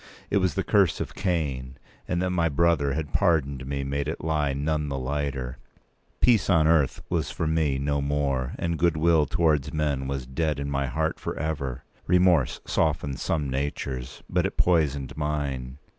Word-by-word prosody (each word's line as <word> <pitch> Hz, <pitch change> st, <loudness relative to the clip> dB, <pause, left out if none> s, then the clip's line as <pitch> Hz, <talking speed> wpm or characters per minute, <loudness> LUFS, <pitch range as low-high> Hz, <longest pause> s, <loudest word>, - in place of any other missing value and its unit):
It -, -, +3 dB
was 95 Hz, -2 st, +1 dB
the 95 Hz, -, 0 dB
curse 100 Hz, -6 st, +3 dB
of -, -, -4 dB
Cain, 70 Hz, -9 st, -2 dB, 0.3 s
and 90 Hz, -, 0 dB
that 90 Hz, -, 0 dB
my 85 Hz, -2 st, +2 dB
brother 75 Hz, -2 st, +2 dB
had 75 Hz, -1 st, -4 dB
pardoned 70 Hz, -8 st, +1 dB
me 70 Hz, 0 st, -2 dB
made 70 Hz, +1 st, -2 dB
it 80 Hz, -, -4 dB
lie 75 Hz, -3 st, +1 dB
none 75 Hz, +2 st, -1 dB
the 70 Hz, -, -2 dB
lighter. 65 Hz, -1 st, -3 dB, 0.6 s
Peace 120 Hz, -5 st, +4 dB
on 85 Hz, -5 st, +5 dB
earth 80 Hz, -4 st, +2 dB
was -, -, -1 dB
for -, -, -3 dB
me 80 Hz, -3 st, +1 dB
no 70 Hz, +1 st, 0 dB
more, 70 Hz, -3 st, 0 dB
and 85 Hz, -2 st, -2 dB
goodwill 80 Hz, -2 st, +3 dB
towards 75 Hz, -5 st, +1 dB
men 70 Hz, -3 st, -1 dB
was 70 Hz, -2 st, -3 dB
dead 75 Hz, +2 st, -1 dB
in 70 Hz, 0 st, -3 dB
my 70 Hz, 0 st, 0 dB
heart 80 Hz, +5 st, -1 dB
for -, -, -4 dB
ever. 70 Hz, -4 st, -3 dB, 0.2 s
Remorse 90 Hz, -5 st, +3 dB
softens 70 Hz, -2 st, 0 dB
some 75 Hz, -3 st, 0 dB
natures; 65 Hz, -1 st, -4 dB
but -, -, +1 dB
it -, -, -9 dB
poisoned 75 Hz, -6 st, +1 dB
mine. 70 Hz, -4 st, -3 dB
75 Hz, 175 wpm, -26 LUFS, 70-80 Hz, 0.6 s, on